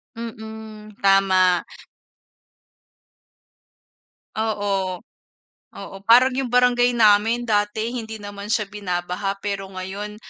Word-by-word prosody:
Mm, 220 -2 -9
tama. 190 -2 +4 2.7
Oo, 210 -2 -1 1.0
oo, - - -9
parang 255 +3 +7
yung 265 - -2
barangay 245 0 +3
namin, 225 +2 +4
dati 215 +1 0
hindi 225 -3 -5
naman 205 -1 -8
siya 215 0 +1
binabaha, 185 0 -3
pero 200 -1 -3
ngayon 195 +3 -7
210 Hz, 85 wpm, -22 LUFS, 195-225 Hz, 2.7 s, parang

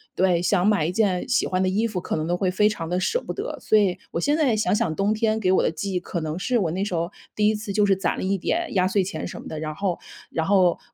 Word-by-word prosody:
对， 180 -2 +2
想 180 0 +2
买 205 -7 +3
一 170 - 0
件 190 -1 +1
喜 255 - +2
欢 185 0 0
的 185 - +2
衣 210 +5 +1
服， 205 -5 -2
可 - - -3
能 155 -1 -2
都 175 +2 0
会 185 -1 +1
非 210 +3 +3
常 165 -6 -4
地 180 - -1
舍 465 - 0
不 - - -5
得。 - - -5
所 215 - +3
以 190 -4 +2
我 170 - -2
现 295 - +2
在 265 -8 +2
想 215 - +1
想， 205 -8 0
冬 200 +4 +1
天 220 0 +1
给 185 -4 +1
我 190 - +4
的 - - +2
记 165 +5 -4
忆 180 - +1
可 175 -1 -4
能 155 +2 -3
是 245 +6 +1
我 180 -8 0
那 185 +4 -1
时 190 - -4
候 170 +1 -2 0.2
第 210 0 +3
1 - - +2
次 210 -2 -5
就 210 0 +3
是 195 - +4
攒 190 - -1
了 - - -3
一 195 +1 +1
点 335 - -2
压 185 -1 +3
岁 195 0 +1
钱 180 -4 -4
什 - - -8
么 - - -9
的， 155 - -5
然 155 -1 -4
后 190 -2 -2 0.3
然 160 - -1
后 185 -3 +3
190 Hz, 325 characters per minute, -24 LUFS, 175-210 Hz, 0.3 s, 我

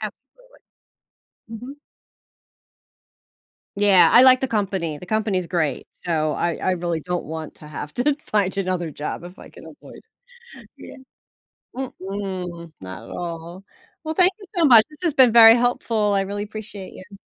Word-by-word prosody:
Absolutely. 275 - -11 0.9
Mhm. 245 +5 -9 2.0
Yeah. 200 -3 +5
I 245 - +7
like 255 0 +7
the 265 - -1
company, 190 -8 -2
the - - -10
company 215 0 -1
is 180 - -4
great, 165 -4 -2 0.2
so 155 -3 -1
I 170 +4 -1
I - - -1
really 170 -2 -2
don't 180 +2 -4
want 160 0 -7
to 150 - -14
have 150 0 -7
to 275 +3 +1
find 200 -3 0
another 185 -4 -2
job 150 +2 -6
if 180 +2 -12
I - - -13
can - - -14
avoid - - -14 0.6
it. - - -16
Yeah. - - -12 0.8
Mm-mm, 190 -8 -6
not 95 +3 -9
at - - -13
all. 170 +2 -7 0.4
Well, 315 -1 -3
thank 360 +3 +4
you 400 - -12
so 335 - +4
much, 235 -6 +8
this 300 - -17
has 335 -4 +1
been 260 -4 +6
very 225 -1 +9
helpful, 230 -3 0
I 195 - +2
really 200 +1 -4
appreciate 210 -2 -9
you. 200 +1 -13
195 Hz, 165 wpm, -22 LUFS, 170-235 Hz, 2.0 s, very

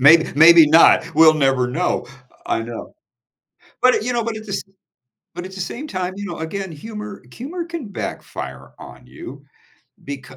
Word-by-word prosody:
Mayb 160 +4 +6
maybe 165 +1 +8
not. 160 +1 +5
We'll 155 0 +7
never 135 -4 +2
know. 165 +9 -1 0.4
I 115 - -1
know. 115 0 -8 0.9
But, 255 0 +5
eh, - - +1
you 250 +3 -2
know 235 -2 -1
but, 230 -1 -3
at 215 - -8
the 200 - -6
s - - -2 0.7
but, 175 +1 -7
at 190 - -10
the 190 - -6
same 260 +11 -6
time, 185 -6 -4
you 205 +1 -6
know, 175 -3 -6
again, 185 +3 -5
humor 210 +4 -9
humor 330 - -6
can 335 -7 -7
backfire 200 - -7
on - - -13
you, - - -11 0.6
becau 135 -1 -8
180 Hz, 180 wpm, -20 LUFS, 155-215 Hz, 0.9 s, maybe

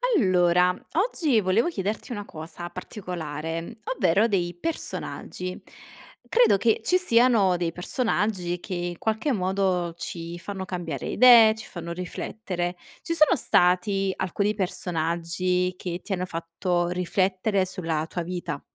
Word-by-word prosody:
Allora, 180 - +4 0.2
oggi 325 - +2
volevo 190 - +2
chiederti 210 - -3
una 205 -3 -4
cosa 165 +1 -8
particolare, 170 0 -6 0.2
ovvero 200 0 +3
dei 180 -5 0
personaggi. 185 - -5 0.7
Credo 475 - +4
che 225 +2 +2
ci 365 +9 +3
siano 235 - +4
dei 170 -1 -1
personaggi 180 -2 -1
che, 185 - -7
in 175 -1 -3
qualche 220 - -1
modo, 185 -4 0
ci 170 0 -6
fanno 190 +1 -5
cambiare 170 -7 -4
idee, 235 -3 +7
ci 220 - -10
fanno 170 -1 -7
riflettere. 180 0 -4 0.3
Ci 335 - -2
sono 320 +1 +5
stati 190 - +2
alcuni 200 +3 0
personaggi 180 0 -1
che 175 0 -5
ti 200 - -3
hanno 185 0 -1
fatto 175 +1 -2
riflettere 185 +2 0
sulla 165 -4 -2
tua 175 +1 -4
vita? 170 -4 -4
185 Hz, 130 wpm, -25 LUFS, 175-210 Hz, 0.7 s, idee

